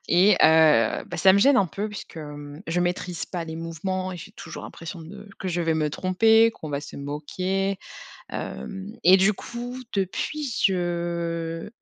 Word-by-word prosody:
Et 185 +4 +6
heu, 155 -8 +5
bah 175 - -6
ça 190 +4 +6
me 200 - +4
gêne 275 +6 +5
un 200 - +4
peu 195 +7 -4
puisque, 210 -4 -9
mmh, 145 +1 -8
je 170 +2 0
maîtrise 180 0 -2
pas 175 -3 -4
les 160 - -6
mouvements 185 +3 -3
et - - -6
j'ai 170 - -10
toujours - - -9
l'impression 170 +1 -8
de 200 +5 -11
que 190 - -5
je 175 -1 -1
vais 165 -1 +1
me 155 -1 +1
tromper, 220 +8 +4
qu'on 160 - -9
va 145 -1 -2
se 145 - -10
moquer, 185 +7 -2 0.5
hem. 195 0 -6
Et 185 +2 +8
du 195 +3 +4
coup, 240 +4 -7 0.2
depuis 245 - -2
je 170 -2 -1
175 Hz, 180 wpm, -25 LUFS, 160-195 Hz, 0.5 s, Et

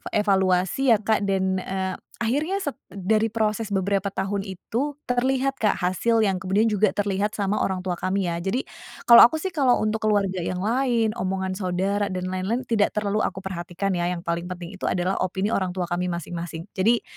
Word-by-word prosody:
evaluasi, 195 +4 +3
ya, - - +1
Kak, 210 -1 +1
dan, 190 -1 +1
eee, 190 0 -3 0.3
akhirnya 295 +11 0
sep 285 - -3
dari 215 +3 +1
proses 220 0 -1
beberapa 195 0 0
tahun 195 +1 -2
itu 235 +10 -3
terlihat, 260 +2 0
Kak, 210 -2 +2
hasil 210 +5 +1
yang 195 -3 +1
kemudian 200 +5 +1
juga 210 -1 +2
terlihat 205 +1 -1
sama 205 0 0
orang 185 -1 -1
tua 180 -2 -3
kami, 185 -1 0
ya, 170 - -2
jadi 195 +9 -1 0.4
kalau 235 -1 +10
aku, 280 - -5
sih, 375 +4 -3
kalau 270 -7 +3
untuk 215 +1 0
keluarga 200 -3 +1
yang 180 +1 -3
lain, 235 -1 +1
omongan 190 0 -1
saudara 190 +2 -1
dan 185 -1 -3
lain-lain, 195 +7 -1
tidak 225 -5 +1
terlalu 210 0 0
aku 190 0 -7
perhatikan, 185 +1 -3
ya, 175 -1 0
yang 175 -1 -3
paling 170 0 -2
penting 180 -1 -7
itu - - -2
adalah 180 +2 0
opini 190 +3 -1
orang 185 -4 -1
tua 185 - -1
kami 175 +1 -2
masing-masing. 170 -1 -5
Jadi, 225 +5 +2
195 Hz, 185 wpm, -24 LUFS, 185-220 Hz, 0.4 s, kalau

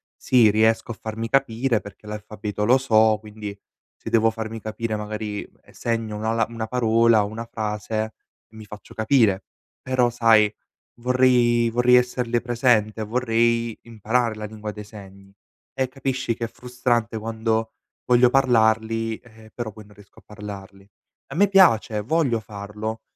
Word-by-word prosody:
sì, 120 -5 +4
riesco 110 +2 +2
a 115 - -8
farmi 110 +1 -4
capire 125 -3 +1
perché 100 +1 -13
l'alfabeto 105 0 -5
lo 125 +3 +5
so, 110 -4 +3
quindi, 105 -1 -9 0.4
se - - -8
devo 115 0 +4
farmi 110 0 -6
capire 110 0 -3
magari 105 0 -4 0.2
e - - -21
segno 115 -2 -3
una 110 +1 -1
la 115 -1 +1
una 115 -1 -5
parola, 115 -2 +3
una 110 +3 -5
frase, 110 0 -3 0.4
mi 110 -1 -12
faccio 105 0 -12
capire. 110 -4 +2 0.4
Però, 130 -2 +2
sai, 115 -3 +4 0.5
vorrei 125 -2 +3
vorrei 125 +2 +4
esserle 125 -1 0
presente, 115 -3 +1
vorrei 115 0 0
imparare 115 +1 -1
la 105 0 -6
lingua 105 0 -7
dei 105 0 -9
segni. 100 -2 -14 0.4
E 130 -1 -1
capisci 130 -3 -2
che 115 - -3
è - - -4
frustrante 120 -2 -2
quando 110 0 -2 0.3
voglio 125 0 +5
parlarli, 115 -3 +2
eh, 110 -2 -18
però 120 -3 -5
poi 110 -2 -13
non 105 - -18
riesco 105 -1 -20
a - - -24
parlarli. 100 -1 -10 0.4
A 135 - -9
me 200 +5 +4
piace, 115 - +4
voglio 130 -1 +1
farlo, 105 +2 -6
110 Hz, 150 wpm, -23 LUFS, 105-120 Hz, 0.5 s, lo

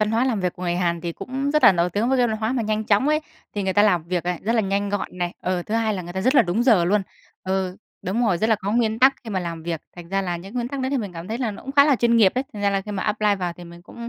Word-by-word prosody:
văn 215 0 +1
hóa 230 +3 +2
làm 235 -6 0
việc 180 -1 -1
của 180 - -9
người 175 -1 0
Hàn 170 -2 0
thì 170 0 -4
cũng 270 +7 -3
rất 300 +1 +2
là - - +9
nổi 175 0 +1
tiếng 210 +6 0
với 265 0 +2
cái 245 - +4
văn 220 - -1
hóa 220 +2 -1
mà 250 -3 0
nhanh 215 0 -1
chóng 210 +7 +2
ấy, 305 +1 +2 0.3
thì 205 - -1
người 190 - 0
ta 205 +2 +4
làm 180 -6 +3
việc 175 0 -2
ấy, 180 -1 -1
rất 225 - 0
là 225 - +3
nhanh 200 0 -1
gọn 200 -2 -4
này. 175 0 -2
Ừ, 180 -1 -1
thứ 215 - -2
hai 225 -2 +1
là 185 - -4
người 175 0 -8
ta 190 - -3
rất 255 +7 +2
là 255 - +7
đúng 200 +5 0
giờ 220 -9 +4
luôn. 205 +3 +2 0.4
Ừ, 190 -1 -2 0.3
đúng 220 +7 0
rồi, 180 -5 +1
rất 220 - +1
là 220 - +5
có 200 0 -3
nguyên 225 -1 +1
tắc 265 +1 +6
khi 225 - -7
mà 190 -3 -1
làm 165 -2 -5
việc, 165 -2 -3 0.2
hành 175 -1 -10
ra 195 +1 0
là 175 -2 -2
những 195 +7 -11
nguyên 240 -1 -2
tắc 280 0 -4
đấy 260 +1 -1
thì 280 - +1
mình 200 -5 -5
cảm 170 +3 -8
thấy 225 - -3
là 245 -4 -1
nó 200 - -9
cũng 270 - -6
khá 280 0 +6
là 285 -4 +3
chuyên 235 0 +3
nghiệp 205 -5 +5
ấy. 255 - -1
Thành 205 -2 -7
ra 200 - +3
là 195 - 0
khi 210 +2 -8
mà 195 -2 -3
apply 210 -1 +1
vào 180 -2 -2
thì 175 +1 -12
mình 170 0 -13
cũng 235 +5 -9
205 Hz, 360 wpm, -23 LUFS, 180-235 Hz, 0.4 s, là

